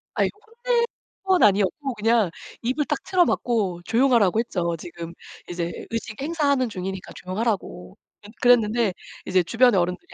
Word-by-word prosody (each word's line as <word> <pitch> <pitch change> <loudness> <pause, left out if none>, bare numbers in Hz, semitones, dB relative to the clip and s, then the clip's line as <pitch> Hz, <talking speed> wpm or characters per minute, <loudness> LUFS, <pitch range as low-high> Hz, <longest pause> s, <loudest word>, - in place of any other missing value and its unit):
아이 - - +2 0.4
혼낼 475 -1 +3 0.4
건 375 -2 +3
아니었고 210 +7 +2
그냥 220 -3 +2 0.3
입을 260 +5 0
딱 295 - -1
틀어막고 235 - +1
조용하라고 230 -4 +3
했죠, 175 -7 -1
지금 170 0 -8 0.4
이제 170 -1 -3 0.2
의식 225 +1 -5
행사하는 280 -5 +1
중이니까 190 -1 -6
조용하라고. 185 - -3 0.3
근 205 - -12
그랬는데 230 -4 +4 0.3
이제 185 0 +3
주변의 230 +2 +4
어른들이 180 +1 -3
220 Hz, 345 characters per minute, -24 LUFS, 185-255 Hz, 0.4 s, 그랬는데